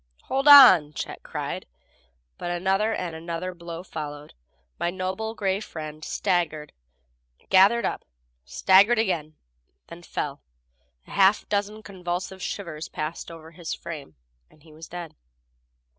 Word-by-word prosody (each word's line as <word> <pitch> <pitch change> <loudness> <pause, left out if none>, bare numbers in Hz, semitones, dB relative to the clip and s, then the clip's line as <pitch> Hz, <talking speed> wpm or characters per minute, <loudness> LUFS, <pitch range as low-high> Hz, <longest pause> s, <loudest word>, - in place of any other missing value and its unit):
"Hold 270 +2 -1
on!" 190 - +9
Chet - - -6
cried, - - -5 0.7
but 175 - -4
another, 190 +5 +1
and 175 -6 -3
another 170 +3 -5
blow 170 0 -8
followed. 150 -4 -7 0.5
My 175 - 0
noble 190 +5 -4
gray 195 -2 0
friend 155 -6 -8
staggered, 160 -7 -1 0.8
gathered 195 +4 +5
up, - - -3 0.4
staggered 195 - +4
again, 170 -8 -1 0.5
then 170 +1 -10
fell. 145 -4 -5 0.6
A - - -15
half 195 +1 +3
dozen 210 +1 -2
convulsive 185 -1 -5
shivers 170 -6 -5
passed 155 +2 -5
over 165 -1 -11
his 170 -1 -5
frame 145 - -9 0.3
and 150 - -24
he 160 -2 -17
was 160 +1 -11
dead. 175 -2 -8
175 Hz, 130 wpm, -25 LUFS, 160-195 Hz, 0.8 s, on